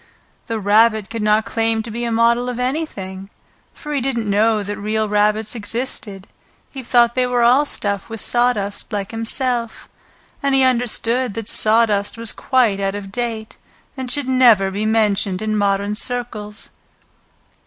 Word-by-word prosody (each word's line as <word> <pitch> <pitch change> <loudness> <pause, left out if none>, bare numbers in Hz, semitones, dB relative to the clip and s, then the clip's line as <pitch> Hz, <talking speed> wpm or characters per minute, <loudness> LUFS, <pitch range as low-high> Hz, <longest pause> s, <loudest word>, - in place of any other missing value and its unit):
The 225 -1 -2
Rabbit 215 +1 +3
could 230 -1 -4
not 210 +1 +2
claim 225 -1 0
to 225 - -7
be 235 +2 -3
a 235 - -2
model 235 +2 +2
of 245 - -4
anything, 210 -9 -4 0.4
for 300 -1 -7
he 280 - 0
didn't 235 -4 -2
know 210 +1 +2
that 205 +1 -5
real 215 +1 -1
rabbits 210 +1 +1
existed; 215 -3 -5 0.5
he 270 - -7
thought 240 -1 +3
they 255 0 +1
were 245 -1 +1
all 255 +5 +5
stuffed 200 -7 -3
with 225 -1 -5
sawdust 240 -4 0
like 200 -2 -3
himself, 235 +1 -2 0.5
and 275 -1 +1
he 265 - +4
understood 245 -2 +1
that 225 -2 -5
sawdust 215 -2 +2
was 230 -2 -1
quite 240 -7 +1
out 195 0 -1
of 200 -1 -7
date 225 -1 -4 0.4
and 260 -2 -5
should 285 0 -1
never 235 -7 +4
be 205 +3 -2
mentioned 210 -4 +1
in 215 0 -2
modern 200 0 0
circles. 215 -3 -4
225 Hz, 160 wpm, -19 LUFS, 205-245 Hz, 0.5 s, all